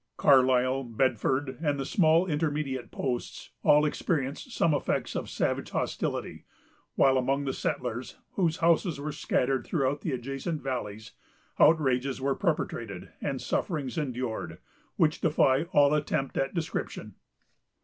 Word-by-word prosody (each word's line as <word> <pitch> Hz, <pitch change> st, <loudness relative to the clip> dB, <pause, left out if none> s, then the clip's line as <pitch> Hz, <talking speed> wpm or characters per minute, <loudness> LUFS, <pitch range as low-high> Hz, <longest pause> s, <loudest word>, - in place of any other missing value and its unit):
Carlisle, 130 Hz, 0 st, +4 dB
Bedford, 130 Hz, +3 st, 0 dB
and 145 Hz, -2 st, +1 dB
the 135 Hz, -, -2 dB
small 165 Hz, +2 st, +4 dB
intermediate 145 Hz, -6 st, -2 dB
posts, 125 Hz, -3 st, -4 dB
all 150 Hz, +1 st, +5 dB
experienced 145 Hz, -, -2 dB
some 165 Hz, -8 st, +2 dB
effects 145 Hz, -, -1 dB
of -, -, -3 dB
savage -, -, -1 dB
hostility; -, -, -3 dB, 0.5 s
while 135 Hz, -1 st, +4 dB
among 135 Hz, +2 st, 0 dB
the 135 Hz, -, -1 dB
settlers, 125 Hz, 0 st, -3 dB, 0.2 s
whose 170 Hz, -5 st, 0 dB
houses 170 Hz, -1 st, +2 dB
were 150 Hz, +2 st, -3 dB
scattered 135 Hz, -2 st, 0 dB
throughout 145 Hz, -2 st, -1 dB
the 160 Hz, -, -2 dB
adjacent 135 Hz, +5 st, -3 dB
valleys, 110 Hz, -5 st, -4 dB, 0.5 s
outrages 135 Hz, -4 st, +3 dB
were 135 Hz, +1 st, +1 dB
perpetrated, 115 Hz, -, -3 dB
and 135 Hz, -3 st, -2 dB
sufferings 145 Hz, -8 st, -2 dB
endured, 125 Hz, -6 st, -3 dB, 0.4 s
which 155 Hz, -1 st, +2 dB
defy 150 Hz, -2 st, +3 dB
all 145 Hz, -4 st, +4 dB
attempt 150 Hz, -2 st, -1 dB
at 135 Hz, +4 st, -1 dB
description. 165 Hz, -2 st, -4 dB
135 Hz, 130 wpm, -28 LUFS, 130-155 Hz, 0.5 s, all